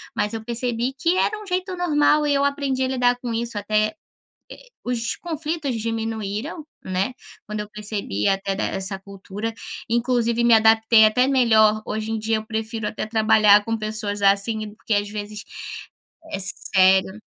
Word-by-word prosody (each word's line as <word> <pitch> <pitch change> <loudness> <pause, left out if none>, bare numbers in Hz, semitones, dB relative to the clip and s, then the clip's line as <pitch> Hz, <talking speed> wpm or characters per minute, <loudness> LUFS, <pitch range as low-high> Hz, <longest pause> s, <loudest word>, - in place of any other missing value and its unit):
Mas 210 +1 -1
eu 225 -1 -5
percebi 240 +1 -1
que 335 +5 +2
era 430 +2 0
um - - -10
jeito 370 0 -2
normal 300 -3 +2
e 290 - +2
eu 280 0 +2
aprendi 280 -2 -1
a - - +1
lidar 245 -1 +2
com 245 - -4
isso 235 0 -3
até, 215 +1 +1 0.8
eh, - - -22
os 235 -2 -2
conflitos 315 -4 -3
diminuíram, 225 - -4 0.2
né, 190 +6 -2 0.3
quando 210 -1 -4
eu 210 0 -7
percebi 205 - -3
até 195 0 0
de 195 - -3
essa 190 0 -1
cultura, 200 +3 -7 0.3
inclusive 235 0 +1
me 235 - +5
adaptei 220 0 +6
até 250 +4 +3
melhor, 220 -5 +4
hoje 220 0 -3
em 225 - -1
dia 220 +1 0
eu 215 0 -5
prefiro 220 0 -4
até 215 - -4
trabalhar 215 -2 +4
com 225 +1 -2
pessoas 215 -1 -2
assim, 205 +2 +2
porque 220 - -5
às 205 0 0
vezes 210 0 -6 0.9
é - - -2
sério. 190 +1 +3
220 Hz, 165 wpm, -22 LUFS, 210-245 Hz, 0.9 s, adaptei